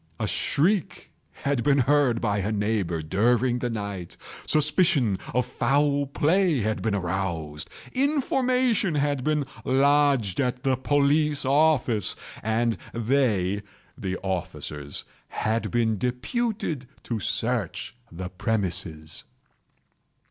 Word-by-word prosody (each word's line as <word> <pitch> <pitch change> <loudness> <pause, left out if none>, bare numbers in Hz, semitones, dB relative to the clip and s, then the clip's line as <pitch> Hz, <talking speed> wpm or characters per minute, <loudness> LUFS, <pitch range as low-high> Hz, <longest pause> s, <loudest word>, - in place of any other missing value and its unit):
A - - 0
shriek 175 +5 0 0.3
had 140 -4 +1
been 140 -1 +4
heard 135 -2 +3
by 105 -3 0
a 100 +2 -1
neighbour 100 -6 -1
during 120 +8 +2
the 120 - -1
night; 100 -6 -5 0.3
suspicion 150 - +2
of 125 +1 +1
foul 140 +2 +1
play 160 +1 +2
had 110 +1 -1
been 110 -2 0
aroused; 85 -5 -3 0.2
information 255 - +1
had 145 -2 0
been 150 -1 +1 0.2
lodged 135 -6 +3
at 125 -2 -1
the 135 -1 +2
police 145 +2 +2
office, 135 - +3 0.3
and 115 +1 0 0.2
they 110 -6 +1 0.3
(the 95 -1 -3
officers) 75 -6 -4 0.2
had 110 +1 -1
been 115 -3 +1
deputed 140 - -2 0.2
to 115 -2 -3
search 110 -1 -2 0.2
the 90 +2 -6
premises. 90 -6 -2
125 Hz, 110 wpm, -26 LUFS, 100-145 Hz, 0.3 s, been